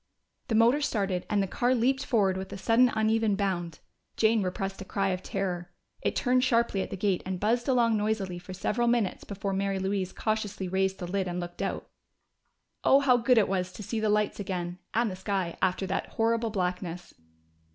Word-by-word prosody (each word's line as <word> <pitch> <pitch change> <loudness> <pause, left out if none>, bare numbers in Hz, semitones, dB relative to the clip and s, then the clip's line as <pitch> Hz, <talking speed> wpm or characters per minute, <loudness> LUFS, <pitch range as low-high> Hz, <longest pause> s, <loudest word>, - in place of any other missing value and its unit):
The 225 - 0
motor 235 +6 +4
started, 195 -9 -1
and 205 -2 +2
the - - -2
car 245 +6 +1
leaped 260 +3 +1
forward 200 -7 +2
with 190 0 -5
a - - -5
sudden 230 +6 +4
uneven 220 -1 +2
bound. 175 -5 -2 0.4
Jane 220 0 +3
repressed 195 +1 -3
a - - -3
cry 195 0 -1
of 185 -1 -2
terror. 180 -3 -3 0.3
It - - -1
turned 255 -1 +2
sharply 235 -5 +2
at - - -4
the - - -5
gate 195 -1 +1
and 185 -1 -4
buzzed 235 +4 +1
along 235 -4 +3
noisily 205 -4 -1
for 180 +1 -11
several 220 +6 -1
minutes 235 -5 +1
before 200 0 -3
Mary 195 0 0
Louise 190 -1 -1
cautiously 210 -3 -2
raised 190 +1 0
the 180 - -5
lid 190 +1 -1
and 175 0 -3
looked 175 0 -6
out. - - -3 1.0
Oh, 275 +1 +6
how 265 -3 +5
good 245 +1 +3
it 215 - +5
was 185 -1 -1
to 210 - -8
see 225 +3 -3
the 215 -1 +1
lights 210 0 +1
again, 180 -3 -4
and 230 -2 +1
the - - -5
sky 190 -2 -2
after 190 +1 +1
that 190 - -2
horrible 230 0 0
blackness! 180 -3 -3
200 Hz, 200 wpm, -28 LUFS, 185-225 Hz, 1.0 s, Oh